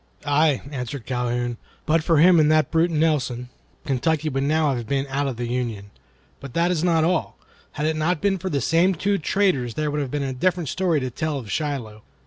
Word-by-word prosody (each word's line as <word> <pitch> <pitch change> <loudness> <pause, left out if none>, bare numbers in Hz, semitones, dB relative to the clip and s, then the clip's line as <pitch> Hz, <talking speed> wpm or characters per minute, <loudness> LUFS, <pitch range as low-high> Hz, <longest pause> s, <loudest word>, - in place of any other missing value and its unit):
"Aye!" 145 -1 +2
answered 125 -2 -5
Calhoun, 120 -1 -2 0.3
"but 160 0 +2
for 165 0 +3
him 170 +2 +6
and 155 0 +4
that 155 0 +2
brute 165 +1 +3
Nelson, 145 -7 0 0.4
Kentucky 155 +3 0
would 135 -1 -2
now 155 -1 +2
have 120 -2 -5
been 135 +1 0
out 140 +1 0
of 130 -4 -4
the 120 - -3
Union. 115 -5 -3 0.5
But 135 -3 -10
that 170 +1 +2
is 170 -3 0
not 165 -3 +3
all. 175 +1 0 0.4
Had 150 - -2
it 160 0 +1
not 155 +2 0
been 195 +1 +1
for 185 - -3
the 140 -5 -1
same 175 +7 +3
two 200 +4 0
traitors 155 - 0
there 150 -1 -1
would 150 0 -1
have 140 - -3
been 145 +1 -2
a 135 -1 -2
different 175 +3 0
story 180 -5 +1
to 130 -1 -3
tell 155 +4 -2
of 115 -6 -7
Shiloh. 130 -9 -3
150 Hz, 215 wpm, -23 LUFS, 125-165 Hz, 0.5 s, him